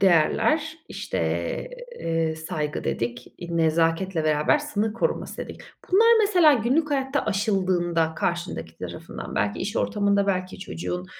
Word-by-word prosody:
değerler, 300 - +3
işte, 200 - -4 0.8
eee, 165 -1 0
"saygı" 155 -2 -3
dedik, 120 +1 -3
i 170 -1 -4
"nezaketle 165 +2 +1
beraber 150 - +3
sınır 220 -8 -1
koruması" 230 - -2
dedik. - - -7 0.3
Bunlar 440 +4 +6
mesela 360 -7 +5
günlük 270 +6 +1
hayatta 270 0 0
aşıldığında 185 -6 +1
karşındaki 170 - -3
tarafından - - -7
belki 100 +1 0
iş 205 +4 -3
ortamında 200 -1 +1
belki 185 -1 -1
çocuğun, 90 - -5
185 Hz, 125 wpm, -25 LUFS, 160-225 Hz, 0.8 s, Bunlar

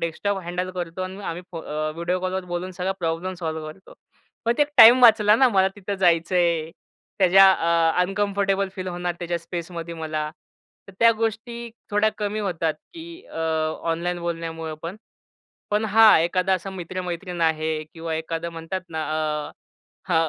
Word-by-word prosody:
Desktop 195 +4 -2
handle 180 +1 -3
करतो 180 0 -5
आणि 185 +2 -6
आम्ही 175 +1 -4
अ, - - -26
फो 165 - -5
मग 155 0 -4
व्हिडिओ 170 +2 -1
कॉलवर 185 0 -2
बोलून 175 +1 -4
सगळा 185 +2 -2
प्रॉब्लेम 170 +2 -2
सॉल्व्ह 160 -3 -4
करतो. 190 +5 -16 0.5
पण 230 - +3
ते - - +6
एक 290 - -1
टाईम 245 +2 +9
वाचला 215 -3 +7
ना, 260 +2 +5
मला 190 -4 +3
तिथं 200 0 -4
जायचंय. 170 -2 +2 0.5
त्याच्या 190 0 +7
अ, 165 -1 +2
अनकम्फर्टेबल 195 +1 0
फील 185 -1 -5
होणार 175 0 -3
त्याच्या 175 -1 -2
स्पेसमध्ये 170 0 -6
मला. 155 -2 -3 0.6
तर - - -11
त्या 230 0 +7
गोष्टी 230 +1 -3 0.2
थोड्या 210 +1 +3
कमी 210 0 -2
होतात, 165 -6 -1 0.2
की 335 +2 -10
अ, - - -9 0.5
ऑनलाईन 175 +2 -2
बोलण्यामुळं 165 -2 -4
पण. 170 +4 -5 0.7
पण 210 +1 +1
हा 220 -1 +7
एखादा 185 +3 +1
असा 190 +1 -5
मित्र-मैत्रीण 180 -1 -5
आहे 160 -1 0
किंवा 165 -1 -4
एखादं 165 +1 -3
म्हणतात 165 +3 -5
ना, 160 -1 -3 0.5
अ, - - -19 0.6
हां, 165 -2 +2
180 Hz, 165 wpm, -23 LUFS, 165-195 Hz, 0.7 s, टाईम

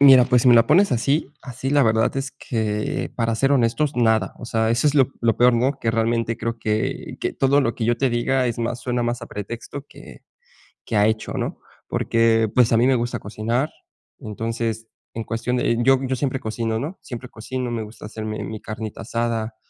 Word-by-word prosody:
Mira, 135 -3 +8
pues 125 -1 +3
si, 125 - +5
me 120 - +8
la 115 -1 +6
pones 185 +3 +4
así 135 +4 0
así, 130 +1 -5
la 145 -1 +4
verdad 110 +1 +2
es 135 0 -2
que 105 -3 -2
para 115 -1 0
ser 135 +5 +2
honestos, 135 +4 +2
nada. 110 -4 +2
O - - -8
sea, 110 -1 0
eso 120 +6 +2
es 145 - +3
lo 135 -4 +4
lo 115 -2 +2
peor, 125 0 +5
¿no?, 130 +4 +1
que 115 - +1
realmente 115 0 0
creo 115 0 -3
que 110 0 -2
que - - -1
todo 140 +1 +3
lo 120 -4 0
que 115 - -3
yo 120 +1 +2
te 135 +1 +1
diga 125 +2 +1
es 120 -1 -2
más 120 +1 -2
suena 125 -1 -1
más 120 0 -2
a - - -6
pretexto 115 +8 -7
que - - -14 0.6
que 115 - -3
ha 105 +1 +5
hecho, 110 0 -2
¿no? - - -3 0.3
Porque 115 -1 +2
pues 125 -3 +4
a 115 - +4
mí 120 - +4
me 135 - +4
gusta 120 0 -2
cocinar, 115 +7 -2 0.5
entonces, 115 -1 -3 0.3
en 115 - -4
cuestión 120 +3 -2
de 115 -1 +1
yo 135 0 +5
yo 130 0 -1
siempre 130 0 -1
cocino, 110 0 -2
¿no?, 155 +10 -5
siempre 125 0 -8
cocino, 125 +2 -5
me 115 -2 -2
gusta 105 0 -11
hacerme 110 0 -5
mi 110 -1 -6
carnita 110 0 -6
asada, 115 -1 -2
115 Hz, 215 wpm, -22 LUFS, 115-130 Hz, 0.6 s, Mira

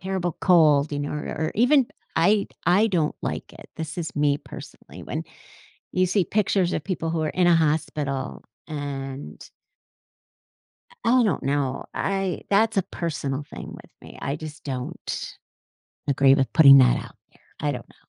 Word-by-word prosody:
"Terrible 185 -3 -2
cold," 155 -5 +4
you 145 - -3
know, 145 - -3
or 150 - -4
or 155 +1 -2
even 250 +3 +4 0.3
I 205 0 +3 0.2
I 200 +6 +4
don't 165 -6 0
like - - -4
it. - - -14
This 160 0 -5
is 160 - -4
me, 145 -1 +2
personally, 135 -2 -12
when - - -4 0.7
you 185 0 +2
see 185 0 +1
pictures 195 -3 +1
of - - -2
people 165 -4 -2
who 160 -1 -1
are 155 - 0
in 180 -1 +1
a 175 - +6
hospital, 150 - -1 0.2
and 140 -2 -6 1.6
I 250 +2 +4
I - - +5
don't 200 - 0
know. 135 -1 -1
I 195 -2 -1
that's 220 +2 +3
a 195 - +3
personal 145 -5 -4
thing - - -9
with - - -13
me. - - -12
I 140 +2 -2
just 155 0 -9
don't 130 -3 -5 0.7
agree 135 0 +5
with 135 -3 0
putting 140 -4 +9
that 125 -1 +5
out - - -12 0.2
there. - - -27 0.2
I 145 0 0
don't 125 -3 -7
know. - - -22
155 Hz, 170 wpm, -24 LUFS, 140-185 Hz, 1.6 s, putting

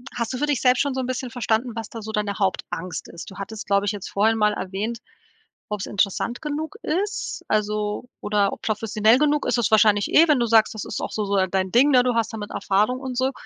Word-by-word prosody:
hast 235 0 -2
du 255 - -3
für 295 - 0
dich 290 -4 0
selbst 250 -1 +4
schon 280 -2 0
so 260 - -2
'n 250 - -4
bisschen 255 0 -3
verstanden, 240 0 0
was 225 -2 -5
da 225 - -8
so 220 +1 -6
deine 210 -1 -1
Hauptangst 185 -2 -3
ist? 170 - -9
Du - - -11
hattest, 210 +2 -7
glaube 200 0 +2
ich, 205 - +1
jetzt 205 -3 -6
vorhin 220 +3 +2
mal 210 -1 +3
erwähnt, 205 +5 -4 0.7
ob's 210 -1 -3
interessant 205 +4 -1
genug 310 +5 -4
ist, 395 +7 -2
also, 210 +2 -1
oder 205 -1 +1
o - - -4
professionell 215 +2 +2
genug 295 0 +2
ist 245 0 +1
es 235 - +1
wahrscheinlich 215 -2 +4
eh, 330 - +7
wenn 300 -3 +4
du 235 - +2
sagst, 220 -1 +4
das 215 - -5
ist - - -4
auch - - -4
so 215 - -2
so, 200 0 0
äh, 190 -1 +2
dein 190 0 -1
Ding, 265 +5 +5
ne? 255 -3 +6
Du 250 - +1
hast 230 0 0
damit 215 -2 -6
Erfahrung 210 +6 +1
und 260 -2 -5
so. 260 +1 +1
220 Hz, 245 wpm, -23 LUFS, 205-250 Hz, 0.7 s, eh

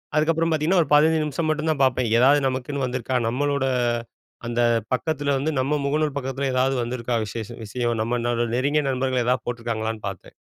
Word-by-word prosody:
அதுக்கப்புறம் 165 +2 +2
பார்த்தீங்கன்னா 160 +4 +3
ஒரு 145 - -12
15 160 +2 +4
நிமிஷம் 155 +2 -2
மட்டும் 155 +1 -1
தான் 145 -3 -1
பார்ப்பேன். 130 -2 +2
எதாவது 140 +4 +5
நமக்குன்னு 130 +1 -2
வந்திருக்கா? 125 0 -3
நம்மளோட 140 +2 0 0.8
அந்த 120 0 0 0.3
பக்கத்தில 145 +1 0
வந்து 145 +4 -1
நம்ம 140 +3 +1
முகநூல் 150 +1 0
பக்கத்தில 135 0 -2
ஏதாவது 130 +1 +2
வந்திருக்கா? 120 0 -3
விசேஷம் 115 +2 -7
விஷயம் 120 +2 -2
நம்ம 120 +2 -1 0.4
நெருங்கிய 145 +4 +1
நண்பர்கள் 130 -1 0
ஏதாவது 125 0 +1
போட்டிருக்காங்களான்னு 115 -2 -3
பார்ப்பேன். 95 -2 -11
130 Hz, 160 wpm, -23 LUFS, 120-150 Hz, 0.8 s, எதாவது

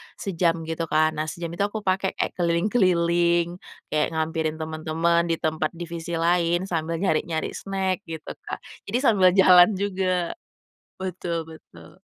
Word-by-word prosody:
sejam 170 -3 0
gitu 165 0 -3
kan, 155 0 +3
nah 155 0 -3
sejam 170 0 -5
itu 170 - -9
aku 215 0 -6
pakai 190 0 0
kayak - - -1
keliling-keliling, 170 -1 +2 0.3
kayak 150 -1 +2
ngehampirin 160 0 -1
temen-temen 160 +2 0
di 165 - +1
tempat 155 0 -2
divisi 170 0 -5
lain 170 +1 +2
sambil 165 -3 -2
nyari-nyari 160 -2 -1
snack 190 -1 -2
gitu, 160 -1 -7 0.2
Kak, - - -6 0.2
jadi 245 - 0
sambil 190 -7 +5
jalan 185 +1 +7
juga. 185 -3 -1 0.7
Betul 175 -3 -3
betul. 85 - -15
170 Hz, 140 wpm, -24 LUFS, 160-185 Hz, 0.7 s, jalan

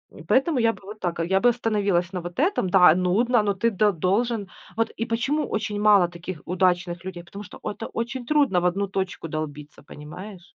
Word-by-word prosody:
И - - -11
поэтому 270 0 +2
я 230 -1 +3
бы - - -16
вот 210 +2 -10
так, 175 -3 -3
я 190 +2 +2
бы 245 - +5
остановилась 205 -6 0
на 180 - -3
вот 175 +6 -7
этом. 320 - +1
Да, 180 -3 +7
нудно, 215 +7 +2
но 205 -1 0
ты 230 +4 +1
д 210 +1 +3
должен. 200 +5 0 0.3
Вот 225 - 0
и 230 - -4
почему 270 +7 0
очень 210 -1 -3
мало 205 -4 +5
таких 175 0 -8
удачных 175 -1 0
людей? 180 -2 -7
Потому 200 +4 -10
что - - -12
это 225 +2 -5
очень 240 +2 -4
трудно 275 -10 +2
в 180 - -2
одну 200 +3 -1
точку 190 -3 -4
долбиться, 150 -2 -6
понимаешь? 175 +7 -10
195 Hz, 205 wpm, -24 LUFS, 175-225 Hz, 0.3 s, Да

